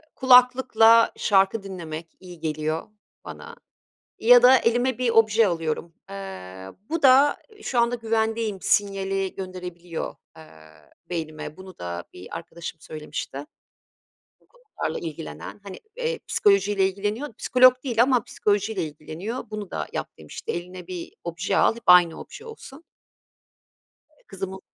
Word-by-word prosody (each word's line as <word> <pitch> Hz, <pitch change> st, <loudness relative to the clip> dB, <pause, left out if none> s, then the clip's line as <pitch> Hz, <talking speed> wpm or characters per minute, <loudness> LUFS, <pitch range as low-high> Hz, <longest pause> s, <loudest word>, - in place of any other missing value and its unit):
kulaklıkla 250 Hz, -3 st, +6 dB
şarkı 195 Hz, +1 st, +2 dB
dinlemek 170 Hz, -4 st, -7 dB
iyi 180 Hz, -2 st, -12 dB
geliyor 155 Hz, +2 st, -3 dB, 0.4 s
bana -, -, -9 dB, 0.6 s
ya 245 Hz, +1 st, +7 dB
da 255 Hz, +1 st, +8 dB
elime 245 Hz, +2 st, +1 dB
bir 250 Hz, -2 st, +1 dB
obje 225 Hz, -1 st, +4 dB
alıyorum. 165 Hz, -1 st, -3 dB, 0.2 s
Iıı, 95 Hz, -, -9 dB
bu 330 Hz, 0 st, -2 dB
da 275 Hz, +2 st, +6 dB, 0.3 s
şu 255 Hz, -, -2 dB
anda 235 Hz, +1 st, +2 dB
güvendeyim 225 Hz, -2 st, -1 dB
sinyali 195 Hz, -2 st, 0 dB
gönderebiliyor, 180 Hz, -3 st, -6 dB, 0.2 s
eee, 160 Hz, -, -12 dB, 0.7 s
beynime. 155 Hz, -2 st, -5 dB
Bunu 190 Hz, -1 st, -12 dB
da 85 Hz, 0 st, -5 dB
bir 90 Hz, +1 st, -9 dB
arkadaşım 165 Hz, -1 st, -8 dB
söylemişti. 150 Hz, -2 st, -7 dB, 1.0 s
Bu -, -, -32 dB
konularla -, -, -6 dB
ilgilenen 85 Hz, -, -8 dB
hani, 195 Hz, -2 st, -9 dB, 0.2 s
eee, 485 Hz, -1 st, -2 dB
psikolojiyle 200 Hz, -1 st, +3 dB
ilgileniyor, 210 Hz, +7 st, -4 dB
psikolog 255 Hz, 0 st, +6 dB
değil 235 Hz, -4 st, +2 dB
ama 250 Hz, -3 st, +2 dB
psikolojiyle 205 Hz, -1 st, -1 dB
ilgileniyor. 160 Hz, -, -6 dB
Bunu 210 Hz, -3 st, -6 dB
da -, -, -3 dB
yap -, -, -4 dB
demişti. 75 Hz, -2 st, -7 dB
Eline 180 Hz, +1 st, -7 dB
bir 180 Hz, -2 st, -7 dB
obje 175 Hz, +4 st, -2 dB
al, -, -, +4 dB
hep 235 Hz, -, -11 dB
aynı 175 Hz, -2 st, +6 dB
obje 455 Hz, -, -11 dB
olsun. 330 Hz, -9 st, -12 dB, 1.3 s
Eee, 300 Hz, -, -31 dB
kızımın 190 Hz, -1 st, -6 dB
195 Hz, 130 wpm, -24 LUFS, 170-235 Hz, 1.3 s, da